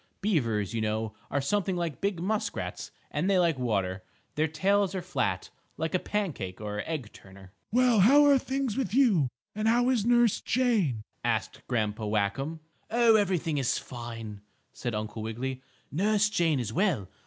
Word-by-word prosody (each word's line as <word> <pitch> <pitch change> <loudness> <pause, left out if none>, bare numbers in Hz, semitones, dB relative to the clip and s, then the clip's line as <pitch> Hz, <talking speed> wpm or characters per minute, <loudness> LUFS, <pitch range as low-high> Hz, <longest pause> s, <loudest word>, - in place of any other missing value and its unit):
Beavers, 115 - 0
you 115 - -1
know, 110 0 -1 0.2
are 140 - 0
something 190 +4 0
like 170 -4 -3
big 200 -3 0
muskrats, 205 - -3 0.2
and 160 +7 0
they 195 - +4
like 170 -6 +2
water. 100 -6 -1 0.3
Their 155 +1 +1
tails 195 +5 +1
are 185 - -2
flat, 180 0 -2 0.3
like 160 0 -2
a 185 - +2
pancake 155 - -3
or 105 -1 -3
egg 145 -9 -4
turner. 95 -1 -15 0.2
"Well, 245 -1 +4
how 280 +9 +7
are 280 -2 +6
things 265 -3 -2
with 245 -5 -1
you, 215 - +4 0.3
and 215 +1 -1
how 240 +2 +3
is 235 -5 +1
Nurse 240 -1 +3
Jane?" 210 - +1 0.2
asked - - -1
Grandpa 110 -3 -1
Whackum. 110 +10 -1 0.3
"Oh, 235 0 +5
everything 175 -7 +1
is 130 - +1
fine," 115 -4 -7 0.3
said 120 -3 -4
Uncle 105 +1 -4
Wiggily. 125 +4 -4 0.3
"Nurse 210 +6 +2
Jane 165 -7 +2
is 110 -3 -3
well. 170 - +1
160 Hz, 165 wpm, -28 LUFS, -, 0.3 s, how